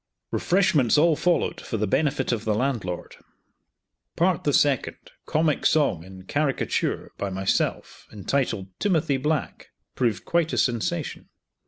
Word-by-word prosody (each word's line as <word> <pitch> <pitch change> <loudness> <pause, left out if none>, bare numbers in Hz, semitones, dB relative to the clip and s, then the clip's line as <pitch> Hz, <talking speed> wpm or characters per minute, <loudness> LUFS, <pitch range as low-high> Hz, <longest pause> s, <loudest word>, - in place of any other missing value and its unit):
Refreshments 155 - +3
all 160 +1 +5
followed, 175 +2 0
for 115 - -4
the 105 - 0
benefit 135 +5 0
of 115 -3 -1
the 110 -2 0
landlord. 110 -8 -2 1.0
Part 180 0 +3
of - - -24
the 145 - +3
second, 140 -3 +2
a - - -20
comic 155 -1 +1
song, 140 - +2
in 95 0 -12
caricature, 145 +6 -1
by 100 - -2
myself, 95 +1 -2
entitled 105 -2 -2
"Timothy 160 -8 +1
Black," 150 +3 -2 0.2
proved 115 -7 -1
quite 170 -2 +1
a - - -1
sensation. 150 +6 -1
135 Hz, 140 wpm, -25 LUFS, 105-155 Hz, 1.0 s, all